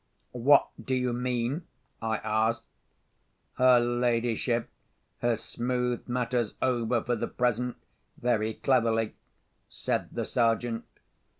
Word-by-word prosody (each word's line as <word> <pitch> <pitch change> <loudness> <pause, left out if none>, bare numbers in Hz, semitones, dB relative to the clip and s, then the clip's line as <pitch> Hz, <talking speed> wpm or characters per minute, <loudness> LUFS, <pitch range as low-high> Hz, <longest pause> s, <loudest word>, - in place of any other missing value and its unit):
"What 135 +4 +5
do 130 - 0
you 125 -1 0
mean?" 125 +5 -1 0.3
I 110 -1 0
asked. 110 +2 +1 0.9
"Her 125 -1 +7
ladyship 120 -1 +1 0.5
has 120 -2 0
smoothed 125 0 -2
matters 120 -2 0
over 120 -2 +1
for 120 - 0
the 115 - -2
present 125 0 0 0.4
very 110 -3 0
cleverly," 115 -4 +2 0.6
said - - -2
the - - -3
Sergeant. 115 0 +1
120 Hz, 105 wpm, -28 LUFS, 115-125 Hz, 0.9 s, Her